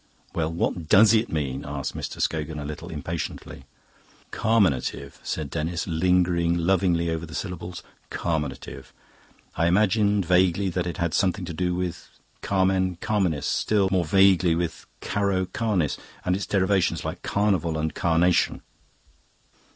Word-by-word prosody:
"Well, 80 -1 -1
what 85 -1 -2
DOES 105 +2 +7
it 115 +1 +2
mean?" 70 -3 -2
asked 70 -1 -4
Mr. - - -5
Scogan, 80 -1 -1
a 75 - -5
little 75 0 -7
impatiently. 80 +3 -6 0.7
"Carminative," 90 - 0
said 75 -4 -4
Denis, 85 +2 -2
lingering 85 0 +2
lovingly 85 -1 +1
over 80 0 -3
the 80 - -9
syllables, 90 -2 -5 0.3
"carminative. 80 -5 -4 0.6
I 85 +1 +2
imagined 100 +1 +3
vaguely 90 +2 +3
that 90 0 -2
it 85 - -4
had 85 -3 -1
something 95 0 +1
to 85 - -6
do 90 +2 -1
with 90 -1 -4 0.3
carmen 95 -1 +1
carminis, 90 -5 -1
still 100 -3 +1
more 90 -2 +2
vaguely 95 -1 +4
with 85 -1 -3
caro 100 -2 0
carnis, 95 - -1 0.3
and 90 - +2
its 100 - -4
derivations, 95 -1 +1
like - - -4
carnival 95 -6 0
and 80 0 -2
carnation. 85 +1 +2
90 Hz, 135 wpm, -25 LUFS, 80-95 Hz, 0.7 s, DOES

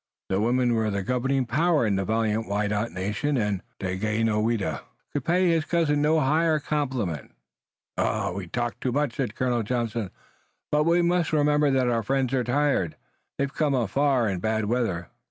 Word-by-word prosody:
The 95 +1 +1
women 120 +2 +2
were 110 -1 +1
the 100 -1 -2
governing 130 +3 0
power 150 +3 +2
in 105 -2 +1
the 95 0 -1
valiant 110 +1 0
Wyandot 105 +2 -1
nation, 105 +10 -1
and 105 -4 0 0.2
Daganoweda 105 - 0 0.3
could 145 - -2
pay 180 +5 +2
his 165 -2 +2
cousin 155 -4 +1
no 155 +2 +3
higher 155 +3 +2
compliment. 130 - -3 1.0
"We 95 -1 -5
talk 120 +5 -3
much," 140 +3 0
said 125 -6 -2
Colonel 125 -2 0
Johnson, 115 -2 -2 0.6
"but 150 0 +3
we 170 +1 +3
must 175 0 +1
remember 150 -1 +3
that 130 -2 +2
our 115 -1 +1
friends 135 +2 0
are 130 -2 +2
tired. 125 - +1 0.4
They've 140 0 -1
come 150 -3 +1
afar 130 +1 +2
in 95 -3 -1
bad 110 +2 0
weather. 105 -7 -1
120 Hz, 160 wpm, -26 LUFS, 105-145 Hz, 1.0 s, no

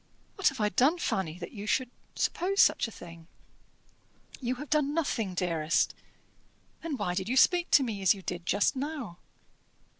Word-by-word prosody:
What 390 - +1
have 265 - -9
I 210 -1 +2
done, 270 - +3
Fanny, 185 - -2
that 170 -1 -8
you 210 -2 -8
should 255 +2 0 0.2
suppose 390 +3 -1
such - - +5
a - - -10
thing?" 170 -4 -12 1.1
"You 250 -1 -2
have 285 +2 -9
done 300 -1 +1
nothing, 225 - -1
dearest." 165 -3 +1 0.9
"Then 320 -4 -4
why 180 - -2
did 190 +3 -3
you 260 - 0
speak 350 +5 +4
as 205 -7 +1
you 190 - -11
did 175 -1 -5
just 205 +7 +2
now?" 270 - -5
225 Hz, 160 wpm, -29 LUFS, 180-290 Hz, 1.1 s, such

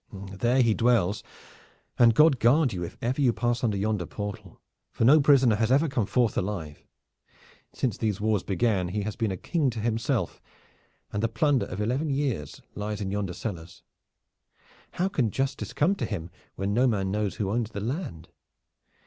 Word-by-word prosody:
"Then 95 -1 -9
there 125 +2 +3
he 115 -2 +3
dwells, 110 -4 +2 0.8
and 115 -2 +6
God 150 -3 +5
guard 130 +2 +4
you 90 - -4
if 85 - -7
ever 130 +5 0
you 130 -3 +4
pass 120 +1 -1
under 105 -4 +1
yonder 100 -3 -1
portal, 105 -1 -7 0.3
for 115 - -1
no 145 +6 +7
prisoner 135 -6 +5
has 110 +2 +1
ever 145 +5 +4
come 120 -8 -1
forth 120 -4 +1
alive! 90 -7 -4 0.9
Since 125 -5 -2
these 105 -3 -1
wars 105 -2 +1
began 95 -1 0
he 100 +3 -2
hath 105 0 -5
been 110 -2 +1
a 95 - -4
king 155 - 0
to 115 -2 -5
himself, 115 - -1 0.7
and 105 - -1
the 115 - +2
plunder 140 +2 +1
of 90 - -6
eleven 130 +9 -1
years 135 - -2
lies 105 0 -4
in 95 -2 -3
yonder 100 -3 -2
cellars. 85 -5 -7 1.1
How 180 - 0
can 135 - 0
justice 135 +5 -2
come 165 +7 +2
to - - -2
him, 90 -5 -5 0.2
when 100 +1 -2
no 125 +4 +3
man 100 -5 0
knows 105 -1 -1
who 100 -3 -2
owns 115 0 -1
the 100 - -6
land? 115 - -5
110 Hz, 185 wpm, -27 LUFS, 100-130 Hz, 1.1 s, no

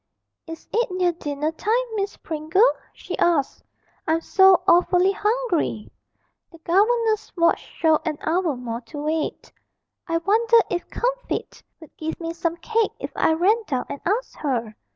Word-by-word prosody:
'Is 325 0 -9
it 475 0 +1
near 365 -1 +1
dinner 300 -2 -3
time, 445 +9 0
Miss 400 -1 -3
Pringle?' 320 +9 +2 0.2
she - - -7
asked. 325 -6 +1 0.4
'I'm 320 +1 +1
so 380 +1 +5
awfully 360 +2 +4
hungry!' 415 - -1 0.6
The 330 - -14
governess's 430 +6 +1
watch 335 0 +3
showed 315 -2 +1
an 315 -3 -2
hour 330 -2 0
more 240 -1 -5
to 295 +5 -11
wait. 305 +2 -3 0.6
'I 330 -1 0
wonder 450 +7 +3
if 350 -1 -3
Comfitt - - -3 0.2
would 315 - -15
give 320 0 -4
me 330 -1 -4
some 335 0 -2
cake 450 +5 0
if - - -6
I 320 - +3
ran 390 +8 +2
down 260 -4 -2
and 280 - -6
asked 435 +7 -2
her!' 235 -7 -2
340 Hz, 150 wpm, -23 LUFS, 315-415 Hz, 0.6 s, so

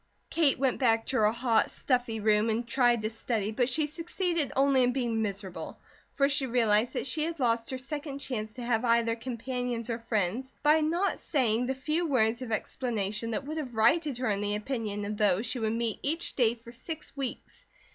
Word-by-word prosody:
Kate 315 -5 +3
went 265 -1 +1
back 225 -3 +3
to 260 - -1
her 215 -1 +4
hot, 235 -1 +2
stuffy 245 -4 -1
room 210 +1 +3
and 230 +2 -1
tried 240 -2 +3
to 215 - 0
study, 225 -2 -2
but 245 +3 +1
she 300 +4 +1
succeeded 335 0 -1
only 270 -1 +4
in 250 0 +3
being 235 -4 0
miserable, 200 -3 -5 0.3
for 275 - +2
she 280 -1 0
realized 230 -1 +2
that - - -2
she 300 +3 0
had 330 0 -3
lost 230 -2 +1
her 260 - -3
second 285 +2 -5
chance 220 -6 -4
to 250 - -6
have 235 -1 +1
either 230 -1 +3
companions 245 0 -3
or 230 - -2
friends, 230 +3 -1
by 305 +1 +5
not 340 +6 0
saying 245 -4 +1
the 265 - -1
few 305 +6 -1
words 235 -4 +2
of 250 -3 -5
explanation 220 -1 -2
that 230 +4 -3
would 310 +2 -4
have 260 -7 -5
righted 270 +5 +3
her 255 - -1
in 200 -1 0
the 205 0 -1
opinion 210 -3 -3
of 210 +1 -4
those 210 0 +2
she 245 +2 -3
would 220 -1 0
meet 230 -2 -1
each 325 +4 -2
day 235 -3 +3
for 235 0 -13
six 305 +6 -7
weeks. 270 -3 -6
240 Hz, 205 wpm, -29 LUFS, 220-275 Hz, 0.3 s, by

